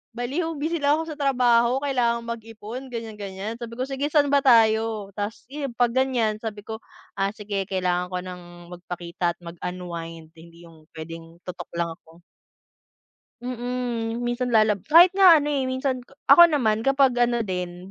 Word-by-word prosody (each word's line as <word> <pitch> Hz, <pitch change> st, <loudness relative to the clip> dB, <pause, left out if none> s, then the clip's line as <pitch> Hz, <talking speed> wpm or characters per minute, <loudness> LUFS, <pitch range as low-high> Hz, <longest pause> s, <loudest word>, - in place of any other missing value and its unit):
baliw 300 Hz, +8 st, -2 dB
busy 320 Hz, +3 st, -2 dB
lang 290 Hz, +1 st, +3 dB
ako 320 Hz, 0 st, -4 dB
sa 305 Hz, -, -9 dB
trabaho 250 Hz, -1 st, +2 dB
kailangan 240 Hz, -4 st, 0 dB
mag-ipon 230 Hz, +2 st, -7 dB
ganyan-ganyan 215 Hz, -2 st, -6 dB
sabi 230 Hz, -1 st, -7 dB
ko, 250 Hz, -, -2 dB
sige 270 Hz, +2 st, -3 dB
saan 290 Hz, -2 st, +2 dB
ba 280 Hz, -, +6 dB
tayo? 220 Hz, -4 st, +3 dB
Tapos 205 Hz, +2 st, -4 dB
yun 280 Hz, -4 st, -5 dB
'pag 245 Hz, -1 st, +3 dB
ganyan 245 Hz, -5 st, +1 dB
sabi 210 Hz, -2 st, -6 dB
ko 220 Hz, 0 st, -6 dB, 0.4 s
ah 195 Hz, 0 st, +2 dB
sige 200 Hz, -2 st, -4 dB
kailangan 180 Hz, -2 st, -1 dB
ko 180 Hz, -, -3 dB
ng 180 Hz, -1 st, -8 dB, 0.3 s
magpakita 175 Hz, -1 st, -4 dB
at -, -, -56 dB
mag-unwind 170 Hz, -2 st, -7 dB
hindi 170 Hz, +1 st, -16 dB
yung 160 Hz, -2 st, -18 dB
pwedeng 165 Hz, +1 st, -9 dB
tutok 180 Hz, -1 st, -7 dB
lang 170 Hz, -1 st, -1 dB
ako. 165 Hz, +1 st, -21 dB, 1.2 s
Mm 245 Hz, -2 st, -3 dB
minsan 240 Hz, +1 st, -1 dB
lalab 215 Hz, -2 st, +4 dB
kahit 335 Hz, +4 st, +8 dB
nga 370 Hz, -6 st, +6 dB
ano 295 Hz, -, -2 dB
eh 275 Hz, -3 st, 0 dB
minsan 260 Hz, 0 st, -1 dB, 0.3 s
ako 345 Hz, -, +10 dB
naman 230 Hz, -8 st, 0 dB
kapag 270 Hz, -2 st, +3 dB
ano 240 Hz, -1 st, +2 dB
din 180 Hz, -2 st, -5 dB
230 Hz, 160 wpm, -24 LUFS, 185-260 Hz, 1.2 s, ako